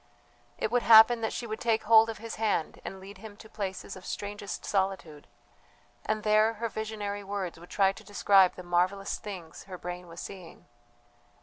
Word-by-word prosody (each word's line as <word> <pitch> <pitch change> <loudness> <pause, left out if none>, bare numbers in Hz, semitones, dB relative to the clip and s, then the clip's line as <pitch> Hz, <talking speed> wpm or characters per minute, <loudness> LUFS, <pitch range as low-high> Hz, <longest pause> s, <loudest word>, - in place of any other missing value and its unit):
It - - -2
would 245 0 +2
happen 230 +1 +7
that 220 - -1
she 240 - -4
would 220 -1 -5
take 230 -3 +1
hold 225 +1 +6
of 225 - -5
his 230 +1 -7
hand 210 -7 -1
and 190 - -7
lead 195 +2 -12
him 215 -2 -11
to 220 - -13
places 195 -3 -5
of 185 - -12
strangest 205 -1 -6
solitude, 190 -6 -2 0.8
and 215 0 -2
there 215 +1 +4
her 230 +2 -3
visionary 210 -2 -4
words 195 -4 -4
would 175 - -14
try 195 -1 +3
to - - -13
describe 195 -2 +4
the 180 - -9
marvellous 180 +3 0
things 190 -6 -9
her 185 -2 -8
brain 180 0 -7
was 170 +1 -11
seeing. 180 -4 -10
205 Hz, 185 wpm, -29 LUFS, 185-220 Hz, 0.8 s, happen